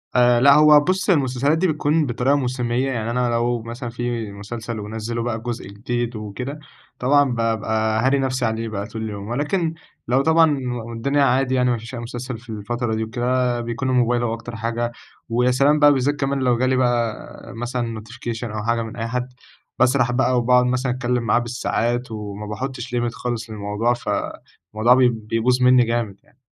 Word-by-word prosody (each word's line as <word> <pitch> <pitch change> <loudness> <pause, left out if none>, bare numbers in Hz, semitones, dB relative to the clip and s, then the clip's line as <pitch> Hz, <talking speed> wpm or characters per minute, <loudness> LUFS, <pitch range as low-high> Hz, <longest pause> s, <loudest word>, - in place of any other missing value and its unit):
آآ 120 -1 +5
لأ، 140 +2 +7
هو 150 0 +7
بُص 185 +6 0
هي - - +7
المسلسلات 140 +1 +1
دي 185 +3 +2
بتكون 155 0 +1
بطريقة 125 +2 +1
موسمية، 125 -1 -1
يعني 115 -2 -2
أنا 125 0 0
لو 120 0 0
مثلًا 120 +2 -6
في 120 -3 -3
مسلسل 110 +3 -6
ونَزِّلوا 110 +2 -4
بقى 115 -1 -2
جزء 120 -2 -5
جديد 120 +4 -3
وكده، 125 +8 -6 0.4
طبعًا 140 +1 +3
بابقى 110 -1 0
هاري 135 +1 +3
نفسي 130 -1 0
عليه 110 0 -2
بقى 100 -2 -4
طول 110 0 -7
اليوم، 100 -2 -5
ولكن 150 - -1 0.3
لو 130 +3 +3
طبعًا 160 -1 +4 0.3
والدنيا 120 +5 0
عادي 130 0 +2
يعني 125 -1 +2
ما 120 - 0
فيش 115 +3 -9
أي 120 - -5
مسلسل 120 +1 -6
في 120 +1 -18
الفترة 110 +2 -3
دي 110 - -1
وكده، 125 +1 0
بيكون 120 +3 -3
الموبايل 120 -1 +2
هو 115 -1 0
أكتر 115 +1 -7
حاجة، 115 +1 -2 0.4
ويا 125 +2 +2
سلام 140 +4 +3
بقى 145 -1 +7
بالذات 140 +2 +1
كمان 140 -1 -1
لو 125 -2 +2
جالي 130 +2 +2
بقى 120 -3 +1 0.4
مثلًا 120 -1 -3
notification 115 +1 -6
أو 105 - -3
حاجة 115 +1 +1
من 115 0 -6
أي 115 0 -3
حد، 125 +2 -3 0.5
باسرح 130 -1 +3
بقى 125 0 +2
وباقعُد 125 +1 +4
مثلًا 125 +1 0
أتكلم 125 -1 -1
معاه 115 +1 +3
بالساعات، 120 0 -2
وما 105 -1 -6
باحطش 125 +3 -5
limit 120 -1 0
خالص 120 -3 -4
للموضوع، 105 +3 -1
فالموضوع 110 -1 -1
بي 125 -1 +5
بيبوظ 115 +3 0
مني 125 0 +6
جامد 115 -4 -2
يعني. - - -29
120 Hz, 185 wpm, -22 LUFS, 115-130 Hz, 0.5 s, لأ